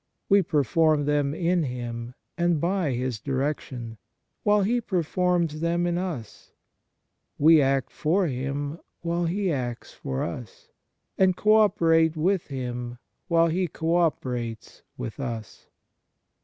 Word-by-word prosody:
We 200 0 +6
perform 155 -1 +2
them 145 0 +1
in 175 +1 +1
Him 120 -3 -5 0.2
and 175 -2 +1
by 175 -3 0
His 125 -2 -2
direction, 130 -3 -3 0.4
while 205 -1 +3
He 240 +5 +1
per 185 -6 0
forms 175 -2 0
them 170 +1 +1
in 175 0 0
us; 160 - -6 0.8
we 160 +1 +6
act 135 -1 +1
for 180 +5 +1
Him 140 +2 -3 0.2
while 170 +1 0
He 190 +2 0
acts 125 -5 -4
for 65 0 -3
us, 100 +5 -7 0.5
and 185 -1 +4
co 215 0 +4
operate 165 -6 +3
with 185 +3 +1
Him 125 -3 -5 0.3
while 170 -1 +4
He 180 +3 0
co 160 +2 -1
operates 125 -9 -2 0.2
with 110 - -6
us." 115 -6 -6
155 Hz, 130 wpm, -26 LUFS, 125-175 Hz, 0.8 s, We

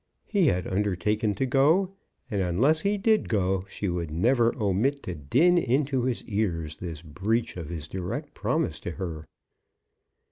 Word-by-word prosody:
He 195 -6 +2
had 90 -8 +1
undertaken 105 +2 0
to 135 - 0
go, 155 +9 +3 0.4
and 100 -2 0
unless 120 - +3
he 205 +3 +1
did 215 +2 +2
go 95 -2 +1
she 100 - -3
would 85 -3 -2
never 115 - +3
omit 115 +6 0
to 90 - -4
din 135 - +3
into 135 -2 +1
his 125 -2 -1
ears 85 -8 -2
this 85 -3 -6
breach 110 +10 -1
of 85 -4 -6
his 80 -3 -5
direct 90 +1 -5
promise - - -1
to 85 - -5
her. 80 -5 -6
105 Hz, 155 wpm, -27 LUFS, 90-135 Hz, 0.4 s, go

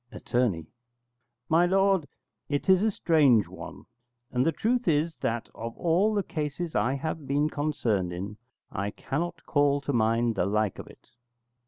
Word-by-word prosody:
Att. - - -12 1.1
My 170 +2 +4
lord, 195 -3 +2 0.4
it 145 -1 -1
is 190 -1 +5
a 220 - +3
strange 145 - +3
one, - - -10 0.5
and 125 0 +1
the - - +4
truth 240 +9 0
is 160 0 +2
that, 115 0 -2
of 115 +3 -7
all 185 +6 +2
the 200 - +1
cases 155 +1 -4
I 130 +3 +1
have 150 0 -4
been 145 +2 +1
concerned 115 - -1
in, 100 +4 -6 0.3
I 100 +1 -2
cannot 160 +10 -4
call 145 -1 +2
to 140 +1 -2
mind 115 0 +2
the 95 - 0
like 105 -1 0
of - - -8
it. - - -18
145 Hz, 160 wpm, -27 LUFS, 115-170 Hz, 1.1 s, is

